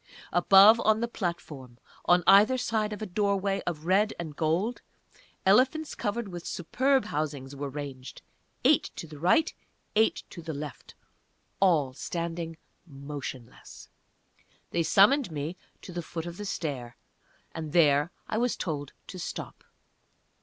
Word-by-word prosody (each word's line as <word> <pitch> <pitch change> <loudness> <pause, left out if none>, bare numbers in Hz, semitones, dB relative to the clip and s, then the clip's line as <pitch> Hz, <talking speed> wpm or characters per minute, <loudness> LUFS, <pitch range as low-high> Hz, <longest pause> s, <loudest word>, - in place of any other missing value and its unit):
Above, 200 +4 +7
on 220 -1 +3
the 235 - -1
platform, 155 - -5 0.3
on 175 0 +4
either 210 +6 +6
side 220 -3 -1
of 210 0 -5
a - - -2
doorway 200 0 0
of 160 -3 -3
red 200 +4 +2
and 160 -4 -6
gold, 170 +11 0 0.6
elephants 260 +10 +3
covered 215 +2 -3
with 175 -2 -7
superb 260 +10 +1
housings 145 -2 -4
were 140 0 -4
ranged 135 -2 -8 0.4
eight - - +4
to - - -6
the 150 -2 -11
right, 295 - +3 0.4
eight 220 +1 +2
to 170 - -8
the 160 -2 -5
left, 145 0 -8 0.6
all 160 -9 +3
standing 165 +2 -4 0.3
motionless. 135 - -9 0.8
They 170 - +1
summoned 205 - +4
me 155 +3 -4 0.3
to - - -9
the 175 - -3
foot 165 0 -6
of 175 0 -7
the 205 - -6
stair, 140 -11 -4 0.5
and 160 -2 -6
there 150 -1 +4 0.2
I 220 - -1
was 245 0 0
told 145 -5 -4
to 185 - -9
stop. - - -6
170 Hz, 140 wpm, -28 LUFS, 150-205 Hz, 0.8 s, Above